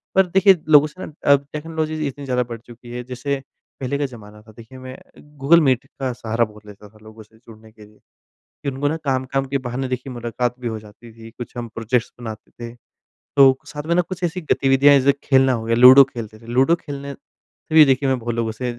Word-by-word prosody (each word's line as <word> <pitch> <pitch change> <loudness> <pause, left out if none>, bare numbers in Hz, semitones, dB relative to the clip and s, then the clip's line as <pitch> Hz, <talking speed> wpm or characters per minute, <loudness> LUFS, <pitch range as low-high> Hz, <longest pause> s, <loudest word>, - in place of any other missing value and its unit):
पर 190 0 +5
देखिए, 195 +2 +5 0.2
लोगों 150 -1 +6
से 170 +5 -11
ना - - -12 0.2
अब 140 0 +1
टेक्नोलॉजी 155 0 -3
इतनी 140 +1 -7
ज़्यादा 125 -1 0
बढ़ 115 -1 -6
चुकी 120 +1 -14
है, 125 0 -6
जैसे 130 +3 -4 0.4
पहले 135 +1 -2
का 145 - -1
ज़माना 105 -5 -12
था 110 +1 -18
देखिए 115 +3 -13
मैं 130 0 -9 0.4
गूगल 165 +5 +5
मीट 130 -3 +1
का 130 -2 -2
सहारा 115 0 -1
बोल 105 -1 -15
लेता 105 0 -14
था 110 - -22
लोगों 110 0 -14
से 110 +1 -25
जुड़ने 110 -1 -17
के 110 -1 -16
लिए 105 0 -22 0.7
फिर 140 - -3
उनको 140 +2 -1
ना 155 - -2
काम-काम 135 0 -1
के 140 +1 -2
बहाने 130 +2 -3
देखिए 130 +1 -5
मुलाकात 120 0 -3
भी 120 - -3
हो 110 -1 -5
जाती 110 +2 -16
थी। 115 0 -13
कुछ 120 +2 -10
हम 120 -1 -5
प्रोजेक्ट्स 115 +1 -1
बनाते 110 -2 -9
थे, 120 -1 -10 0.6
तो 135 -2 +6
साथ 145 - -7
में 170 - +1
ना 180 - +3
कुछ 185 +1 -8
ऐसी 175 +1 -2
गतिविधियाँ 140 +1 +4
जैसे 135 +1 +3
खेलना 135 -1 +3
हो 115 -2 -3
गया, 115 0 0
लूडो 130 +3 +9
खेलते 115 -5 -9
थे 115 - -16
लूडो 130 +7 +3
खेलने 140 -3 -8
से 155 - -15
भी 155 -1 +9
देखिए 135 0 +1
मैं 130 -1 +1
बहुत 120 0 -4
लोगों 115 -1 -2
से 120 +2 -4
130 Hz, 225 wpm, -20 LUFS, 115-140 Hz, 0.7 s, लूडो